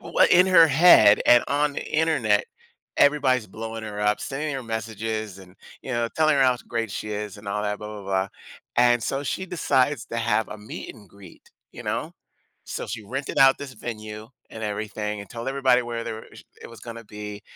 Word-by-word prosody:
w - - -6
in 180 +1 +6
her 170 -3 +7
head 140 -9 +7
and 120 0 +7
on 145 +1 +1
the - - -4
Internet, 150 -10 +2 0.5
everybody's 130 -5 +3
blowing 115 0 -7
her 105 -1 -6
up, 105 0 +1
sending 145 +2 -3
her 135 - -4
messages, 110 -2 -4
and, 95 0 -16 0.3
you - - -7
know, 120 0 0
telling 155 -2 +3
her 135 - +4
how 125 -1 +3
great 115 -2 -2
she 105 - -5
is 105 -1 -5
and 100 -1 -10
all 105 +1 -2
that, 105 0 -2
blah, 105 - -7
blah, 105 -1 -8
blah. 95 0 -1 0.5
And 120 -1 +4
so 135 +3 -2
she 190 +6 -3
decides 145 -7 0
to 115 - -6
have 115 -1 0
a 105 - -8
meet 105 +1 -8
and 105 -4 -17
greet, 95 -2 -16 0.2
you - - -9
know? - - -3 0.5
So, - - -5
she 110 - -6
rented 135 +7 -5
out 135 0 +6
this 140 -2 -8
venue 110 -2 -7 0.2
and 110 - -8
everything 105 0 -4
and 100 - -10
told 115 +2 -5
everybody 130 -2 +3
where 120 -1 -5
there - - -4
were 110 - -11
sh - - -13 0.2
it - - -9
was 115 - -12
gonna 115 0 -8
be, 105 -1 -8
115 Hz, 210 wpm, -24 LUFS, 105-135 Hz, 0.5 s, her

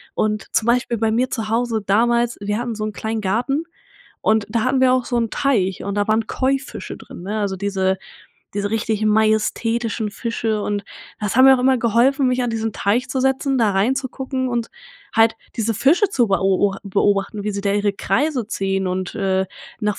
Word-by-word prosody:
Und, 215 -1 -1
zum 220 - +2
Beispiel 240 0 +1
bei 220 0 +1
mir 250 +3 +1
zu 220 -3 -3
Hause 225 -2 0
damals: 235 +4 +2
Wir 205 +1 -1
hatten 240 0 -3
so 215 -1 -5
'n 215 - -4
kleinen 220 0 -3
Garten 250 - 0 0.6
und 220 -1 +2
da 230 0 0
hatten 260 +1 +1
wir 255 -1 +5
auch 255 -2 +1
so 245 - -1
'n 230 -1 0
Teich 200 -10 0
und 200 0 -3
da 205 0 0
waren 220 +1 +2
Koi-Fische 265 0 -2
drin, - - -11
ne, 210 +4 -3
also 200 -2 -1
diese 190 -1 0 0.6
diese 205 0 -1
richtigen 220 -1 0
majestätischen 220 +1 +1
Fische, 220 0 -2
und 205 -1 -2 0.4
das 210 +1 -2
hat 260 - +7
mir 270 0 +9
auch 260 - 0
immer 260 +1 +4
geholfen, 250 +4 +3
mich 250 0 +1
an 245 - 0
diesen 225 -1 -2
Teich 215 +6 0
zu 265 - -1
setzen, 265 0 +1
da 215 -3 +3
reinzugucken 260 +4 -1
und 235 -2 -2 0.4
halt 225 0 +4 0.2
diese 225 0 0
Fische 340 - +3
zu 240 - +2
beo 195 0 +2
o 195 - -5
beobachten, 200 +1 0
wie 210 - 0
sie 200 - -3
da 200 - +1
ihre 205 -1 +1
Kreise 245 - 0
ziehen 195 -3 -1
und, 185 0 -3
äh, 190 -2 +1 0.4
nach 210 -1 -1
220 Hz, 200 wpm, -20 LUFS, 205-245 Hz, 0.6 s, mir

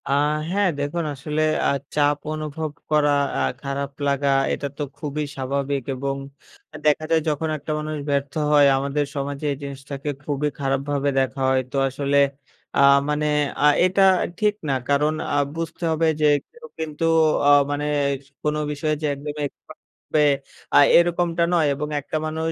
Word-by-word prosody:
আহ 145 +2 +2 0.2
হ্যাঁ, 200 0 +2
দেখুন 145 +4 -2
আসলে 150 +3 -3 0.2
অ্যা - - +3 0.2
চাপ 145 -1 +3 0.2
অনুভব 155 0 -4 0.2
করা 150 -1 +4 0.2
অ্যা 70 - 0 0.2
খারাপ 140 0 -3 0.2
লাগা 140 0 +1 0.2
এটা 140 - -3
তো 150 - -2
খুবই 150 0 -3
স্বাভাবিক 140 0 -2
এবং 135 +1 -2 0.6
আ - - -10
দেখা 150 +1 +3
যায় 165 -1 +4
যখন 155 +2 -1
একটা 150 +1 -6
মানুষ 155 0 -4
ব্যর্থ 140 0 -1 0.2
হয় 145 -1 +6
আমাদের 140 +2 -1
সমাজে 140 +1 -4
এই 140 - -3
জিনিসটাকে 140 +1 -6
খুবই 145 0 -1
খারাপভাবে 140 +1 0
দেখা 135 +1 -1
হয়। 130 0 +3
তো - - -2
আসলে 140 +1 0 0.6
অ্যা - - +3 0.3
মানে 150 0 0 0.3
অ্যা 150 - +5 0.2
এটা 190 +2 +3 0.4
ঠিক 210 -1 +3 0.2
না - - +2 0.2
কারণ 150 +2 +2 0.2
অ্যা 145 - 0 0.2
বুঝতে 165 +1 -5
হবে 160 +1 +2
যে, - - +4 0.3
কেউ 475 +1 -14
কিন্তু 160 0 -3 0.4
ও - - +7 0.2
মানে 145 +1 -2 0.6
কোনো 150 0 0
বিষয়ে 155 +1 -1
যে, - - -1
একদম 145 +1 -6
এক্সপার্ট 140 - -11 0.3
হবে 150 -1 +4 0.5
আ - - +8 0.2
এরকমটা 170 0 +2
নয় 165 -3 +3
এবং 150 +2 -4
একটা 150 - -3
মানুষ 160 +1 -2
145 Hz, 165 wpm, -23 LUFS, 140-155 Hz, 0.6 s, আ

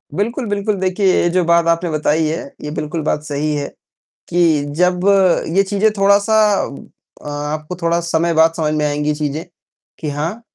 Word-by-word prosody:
बिल्कुल, 235 - -2
बिल्कुल। 205 +1 -1
देखिए, 190 +1 0
ये 175 - +2
जो 180 +1 +1
बात 170 0 +3
आपने 170 +1 +1
बताई 155 +1 +1
है, 160 +2 -3 0.2
ये 150 - -5
बिल्कुल 155 +2 -3
बात 150 0 -1
सही 150 0 -2
है 145 -1 -3 0.6
कि 165 -4 +2 0.2
जब 180 0 +2 0.6
ये 195 - +5
चीज़ें 205 +2 +1
थोड़ा-सा 200 +2 +3 0.9
अ, - - -5
आपको 150 +3 -4
थोड़ा 170 0 +1
समय 170 0 0
बाद 160 0 +4
समझ 155 -2 0
में 150 -1 0
आएँगी 150 +1 0
चीज़ें 150 +1 -3 0.6
कि 155 - -3
हाँ, 160 +10 -4
165 Hz, 170 wpm, -18 LUFS, 150-185 Hz, 0.9 s, ये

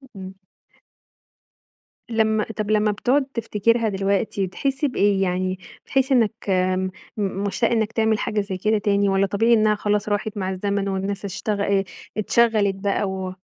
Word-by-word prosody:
امم. 190 0 -8 1.7
لمّا 220 -1 +2
طب 215 -1 -2
لمّا 210 0 +3
بتقعد 260 +7 +1
تفتكرها 230 -2 0
دلوقتي 195 0 0
تحس 270 +9 -2
بإيه؟ 205 -7 +2
يعني 185 0 -1 0.3
بتحس 265 0 +1
إنك 225 -4 +1
آمم 185 0 +1 0.3
م - - -2 0.3
مشتاق 220 +4 0
إنك 220 -2 +1
تعمل 220 -1 +1
حاجة 210 -1 -1
زي 195 -2 -5
كده 215 +3 +1
تاني؟ 200 -1 +1
والّا 195 0 +2
طبيعي 225 +5 +2
إنها 215 -1 +4
خلاص 210 0 -1
راحت 205 +1 -2
مع 190 -2 -2
الزمن 200 +1 -1
والناس 195 +1 -3
اشتغ 200 +1 -3
آآ 200 -1 +2 0.3
اتشغلت 215 -2 +2
بقى 200 0 -1
و 190 -1 -4
205 Hz, 150 wpm, -22 LUFS, 195-220 Hz, 1.7 s, إنها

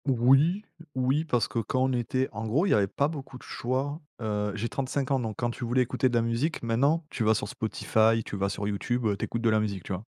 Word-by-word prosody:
Oui, 135 - +4 0.3
oui, 130 +5 +1
parce 120 -7 +1
que 115 - -2
quand 130 +4 0
on 130 0 +1
était 130 +2 0
en 110 +1 -5
gros, 145 - +2
il 200 - +1
y - - +6
avait 100 -2 +3
pas 140 +8 +1
beaucoup 140 -4 -7
de - - -16
choix. 135 +5 -2 0.2
Heu, 105 -2 -1
j'ai 110 +3 -2
35 135 +2 -2
ans, 135 - +3
donc 110 -3 -3
quand 120 -1 0
tu 120 - -7
voulais 125 +2 +2
écouter 125 +1 +1
de 120 - -2
la 115 - +3
musique, 120 +8 -1
maintenant 140 +8 +2
tu 115 - -2
vas 110 +1 +4
sur - - -2
Spotify, 110 +1 +1
tu - - -5
vas 100 0 0
sur 100 +1 -3
YouTube, 120 +4 -1
heu, 105 -2 +2
tu - - -3
écoutes 115 0 -4
de 115 - +4
la 110 - +3
musique, 100 -4 -2
tu - - -4
vois? 90 +3 -4
120 Hz, 265 wpm, -28 LUFS, 110-135 Hz, 0.3 s, y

